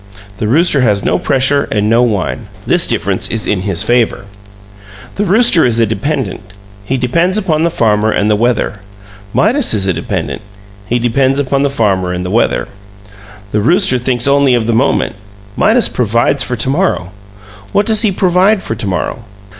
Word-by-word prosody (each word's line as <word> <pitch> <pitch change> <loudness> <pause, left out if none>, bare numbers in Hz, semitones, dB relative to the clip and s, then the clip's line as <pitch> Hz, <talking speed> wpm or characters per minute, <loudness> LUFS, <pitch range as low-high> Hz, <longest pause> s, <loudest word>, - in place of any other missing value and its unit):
The 105 - -1
rooster 150 +3 +2
has 105 -5 +1
no - - +1
pressure 140 +2 +1
and 105 -1 0
no 115 +2 +3
wine; 105 -6 -2 0.2
this - - +2
difference - - -1
is 110 -1 -3
in 100 -3 -1
his 95 -1 0
favor. 120 -2 0 0.9
The 205 - -2
rooster 205 -2 +4
is 115 -2 +1
a 115 - +4
dependent; 110 0 -3 0.4
he 130 +6 -2
depends 170 - 0
upon 165 -7 0
the 170 - +2
farmer 110 -6 +1
and 105 - 0
the 105 - +2
weather. 115 -2 -1 0.5
Midas 235 - +2
is 100 -2 +1
a 95 - +1
dependent; 85 - -4 0.5
he 120 - 0
depends 130 +3 +1
upon 140 0 0
the 140 - +1
farmer 95 -8 0
and 90 0 -4
the 90 - -4
weather. 115 +3 0 0.8
The 105 - 0
rooster 170 - +2
thinks 125 0 -1
only 140 -2 +3
of 115 -2 -1
the 115 - 0
moment; 120 -3 0 0.4
Midas 230 +2 +3
provides 120 +4 0
for 125 - -2
to 120 +3 -1
morrow. 145 - -1 0.6
What 205 - +1
does 220 -2 +2
he 215 - +2
provide 190 +2 +2
for - - -3
to 110 -2 -5
morrow? 95 +4 -3
125 Hz, 180 wpm, -13 LUFS, 105-155 Hz, 0.9 s, rooster